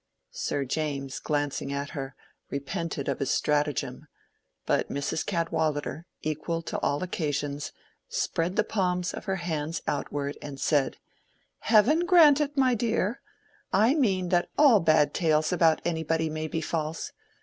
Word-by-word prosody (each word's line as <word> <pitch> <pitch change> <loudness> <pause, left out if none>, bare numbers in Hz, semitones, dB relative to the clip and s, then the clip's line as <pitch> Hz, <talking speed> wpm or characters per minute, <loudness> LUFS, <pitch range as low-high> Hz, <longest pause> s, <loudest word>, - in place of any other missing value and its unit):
Sir 140 -1 -2
James, 140 -1 -3
glancing 145 -2 -2
at 140 +1 -3
her, 135 -2 -6 0.3
repented 140 +1 -4
of 140 - -1
his 135 - -1
stratagem; 150 -2 0 0.6
but - - +1
Mrs. 140 +3 -2
Cadwallader, 160 -2 -1 0.2
equal 155 +2 -2
to - - -3
all 145 +5 0
occasions, 145 -5 -2 0.4
spread 170 +3 -1
the 210 - +3
palms 180 -4 -1
of - - -7
her 190 - 0
hands 165 -3 -3
outward 145 0 -3
and 140 -2 -7
said—"Heaven 220 - 0
grant 310 -6 +7
it, 290 -1 -2
my 260 -2 +4
dear!—I 225 0 -1
mean 195 - +1
that 175 -1 +2
all 280 -8 +7
bad 155 -3 +3
tales 155 0 +2
about 165 -3 +3
anybody 160 -1 0
may 155 0 -3
be 160 +1 -3
false. 160 0 -3
160 Hz, 135 wpm, -27 LUFS, 145-190 Hz, 0.6 s, grant